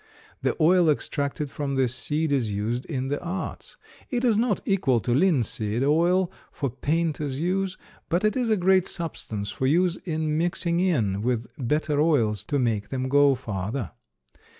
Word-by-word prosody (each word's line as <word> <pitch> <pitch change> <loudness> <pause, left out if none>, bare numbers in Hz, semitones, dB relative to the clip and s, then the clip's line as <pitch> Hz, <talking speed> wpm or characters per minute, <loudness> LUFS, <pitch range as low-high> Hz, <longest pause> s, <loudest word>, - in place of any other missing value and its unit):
The - - 0
oil 170 +1 +5
extracted 145 -1 -1
from 140 -2 -3
this 130 -2 +1
seed 150 +3 -1
is 125 -7 +1
used 110 +5 -2
in 135 -4 -3
the 145 - -2
arts. 180 +2 -5 0.3
It 250 -4 -1
is 235 -4 +4
not 220 -2 +1
equal 150 - +2
to 120 +2 -1
linseed 125 - +1
oil 170 +5 +3 0.2
for 140 -4 -3
painters' 150 0 -1
use, 185 +2 -1 0.3
but 175 +3 +1
it 215 - +2
is 250 -3 0
a 215 - +3
great 185 0 +3
substance 110 - -4
for 130 - -1
use 175 +4 +2
in 155 -2 -2
mixing 170 0 0
in 115 - +1
with 120 0 -1
better 150 +3 0
oils 115 - +2
to 145 - -1
make 115 -6 0
them 130 -1 -2
go 145 0 +5
farther. 105 - -4
145 Hz, 165 wpm, -25 LUFS, 125-175 Hz, 0.3 s, oil